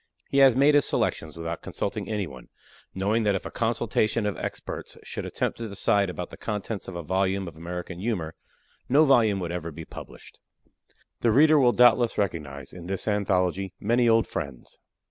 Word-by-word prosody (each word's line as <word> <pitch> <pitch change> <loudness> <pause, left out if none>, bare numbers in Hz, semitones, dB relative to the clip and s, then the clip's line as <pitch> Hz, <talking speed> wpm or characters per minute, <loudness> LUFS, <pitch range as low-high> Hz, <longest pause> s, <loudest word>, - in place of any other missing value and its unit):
He 140 - +3
has 135 -3 +7
made 140 +3 +5
his 145 -1 +5
selections 80 0 -1
without 85 0 -4
consulting 100 -1 -4
any 105 -3 -1
one, 65 -6 -11 0.5
knowing 100 +4 +1
that 105 -2 +2
if 95 - -4
a - - -6
consultation 115 -1 0
of 105 - -1
experts - - -6
should - - -5
attempt - - -2
to 115 -1 -4
decide 100 0 +2
about 90 -1 -6
the - - -10
contents 105 -1 -4
of 95 - -7
a 85 - -5
volume 95 +2 0
of 85 - -9
American 90 +2 -6
humor, 90 -7 -2 0.6
no 145 +5 +6
volume 115 -8 +4
would 85 -1 -3
ever 85 -1 -4
be 80 +1 -9
published. - - -12 0.8
The 120 - +2
reader 150 +6 +6
will 125 -3 +5
doubtless 120 -1 +4
recognize, 75 -8 -3
in 90 -1 -9
this 95 +2 -3
anthology, 95 -2 0
many 120 +3 +2
old 115 0 +4
friends. 70 -6 -6
100 Hz, 185 wpm, -26 LUFS, 85-115 Hz, 0.8 s, has